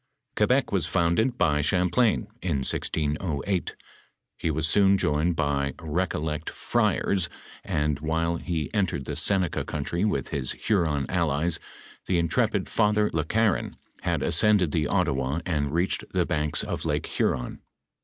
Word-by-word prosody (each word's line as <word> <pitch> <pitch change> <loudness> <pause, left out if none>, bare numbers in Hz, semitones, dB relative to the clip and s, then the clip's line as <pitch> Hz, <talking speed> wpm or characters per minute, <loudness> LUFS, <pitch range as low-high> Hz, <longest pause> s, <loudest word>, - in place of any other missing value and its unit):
Quebec - - +2
was - - +1
founded 110 +9 +1
by 75 -5 +2
Ghamplain, 90 - +2 0.2
in 75 -7 -1
1608. 80 +5 -1 0.6
He - - -2
was 80 0 0
soon 100 +3 +4
joined 80 0 +1
by 70 -2 0
Eecollect 80 -1 -2
friars, 95 -4 0 0.3
and 75 -1 -1
while 80 +2 0
he 80 0 -3
entered 95 -10 0
the - - -4
Seneca 95 -5 +2
country 80 +5 -3
with 85 - 0
his 65 -3 -2
Huron 80 -10 0
allies, 80 -1 0 0.5
the 90 - +2
intrepid 85 -1 +1
Father 105 0 +2
Le 80 -1 +1
Garon 110 +4 0 0.3
had - - -1
ascended 90 0 +3
the 75 -2 0
Ottawa 75 -6 0
and 75 -5 -1
reached 85 +4 0
the 90 -2 +2
banks 75 -3 -1
of - - -4
Lake - - -1
Huron. 60 -1 -1
85 Hz, 135 wpm, -26 LUFS, 75-95 Hz, 0.6 s, soon